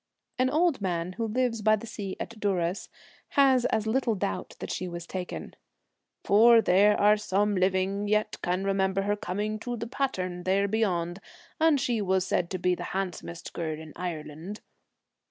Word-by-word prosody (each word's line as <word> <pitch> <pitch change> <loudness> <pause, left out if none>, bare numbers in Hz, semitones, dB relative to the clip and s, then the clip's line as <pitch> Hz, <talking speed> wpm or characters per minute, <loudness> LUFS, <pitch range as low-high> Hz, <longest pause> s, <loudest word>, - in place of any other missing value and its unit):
' - - -34
An 255 0 +3
old 315 - +2
man 175 -2 -1
who 225 +3 -2
lives 230 0 0
by 215 +1 +5
the 215 - -8
sea 205 -4 -6
at 230 -1 -6
Duras 185 -3 -1 0.5
has 265 -3 +5
as 220 - +1
little 230 0 +1
doubt 95 - -3
that - - -6
she 185 - -3
was 175 -1 -6
taken, 180 0 -6 0.3
' - - -55
for 230 +3 +7
there 205 0 +4
are 210 +1 +5
some 205 0 +1
living 190 +2 +1
yet 215 0 +1
can 180 +1 -1
remember 195 0 +1
her 205 +1 +1
coming 210 +2 -3
to 240 +2 -4
the 230 - -4
pattern 210 -8 -2
1 180 - -8
there 195 +2 +2
beyond, 185 -5 0 0.4
and 315 -3 +4
she 240 -4 0
was 190 -1 +1
said 175 -2 0
to 185 - -3
be 180 0 +1
the - - -4
handsomest 175 -2 -5
girl 160 -2 -3
in 160 -1 -10
Ireland.' 170 +2 -6
200 Hz, 185 wpm, -28 LUFS, 180-220 Hz, 0.5 s, for